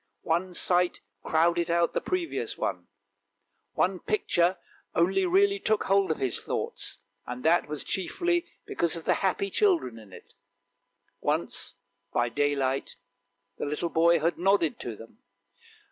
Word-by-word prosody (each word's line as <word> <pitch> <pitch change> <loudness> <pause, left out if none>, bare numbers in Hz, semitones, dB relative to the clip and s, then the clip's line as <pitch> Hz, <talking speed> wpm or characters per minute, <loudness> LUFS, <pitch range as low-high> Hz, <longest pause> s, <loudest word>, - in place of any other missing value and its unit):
One 175 +2 -1
sight 180 0 +3 0.2
crowded 170 +1 +2
out 170 0 +2
the - - 0
previous 365 -2 -2
one; - - -3 0.9
one - - +1
picture 185 - +1 0.4
only 190 - +3
really 400 +2 +3
took 215 - +1
hold 195 -1 +2
of 160 - 0
his 130 -3 -1
thoughts, - - -4 0.3
and 125 +1 -6
that 170 0 +4 0.2
chiefly 345 - -1 0.2
because 170 -1 -1
of 165 - -8
the - - +4
happy 195 +1 0
children 345 - +1
in 105 -3 -15
it; - - -14 0.9
once - - -1 0.4
by 120 0 +1
daylight 135 0 0 0.6
the - - -2
little 155 +3 -2
boy 170 +1 +4
had 165 +2 0
nodded 185 -4 +2
to 115 - -5
them. 115 - -14
170 Hz, 135 wpm, -28 LUFS, 150-200 Hz, 0.9 s, that